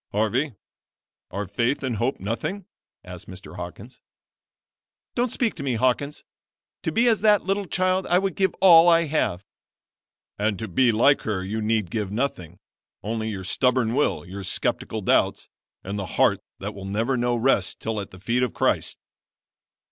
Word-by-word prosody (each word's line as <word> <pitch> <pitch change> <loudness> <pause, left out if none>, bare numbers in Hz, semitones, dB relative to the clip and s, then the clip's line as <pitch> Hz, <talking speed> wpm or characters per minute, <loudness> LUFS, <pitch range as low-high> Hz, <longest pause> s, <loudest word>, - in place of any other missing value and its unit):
"Harvey, 115 +6 0 0.7
are 100 +2 -4
faith 125 +8 -1
and 125 -4 -1
hope 120 +6 -1
nothing?" 120 - -3 0.4
asked - - -9
Mr. - - -10
Hawkins. - - -9 1.1
"Don't 245 -1 0
speak 235 -3 0
to - - -8
me, 135 -3 -1
Hawkins; 130 +5 0 0.6
to - - -2
be 235 +2 +3
as 225 -4 +3
that 210 -2 +4
little 195 +2 -1
child 185 +1 +1
I 175 - +4
would 195 0 0
give 190 -2 +1
all 175 -2 +8
I 170 0 +5
have." 140 - -1 0.9
"And 105 -1 0
to 110 - -5
be 120 +6 +3
like 120 +6 +4
her 100 -4 -2
you 110 +4 -3
need 110 -4 0
give 105 -4 -2
nothing 100 - -3 0.5
only 110 +1 -2
your 95 -3 -5
stubborn 125 +4 +1
will, 145 -8 0
your 95 +2 -7
skeptical 95 - -2
doubts, - - +1 0.3
and 100 +2 -4
the 95 - -4
heart - - +4 0.2
that 105 +2 -5
will 95 -1 -9
never 110 +7 0
know 120 0 +1
rest 115 -5 +1
till 110 -2 -3
at 100 - -8
the 95 - -14
feet 115 +6 0
of 125 -3 -1
Christ." - - 0
120 Hz, 170 wpm, -24 LUFS, 105-155 Hz, 1.1 s, all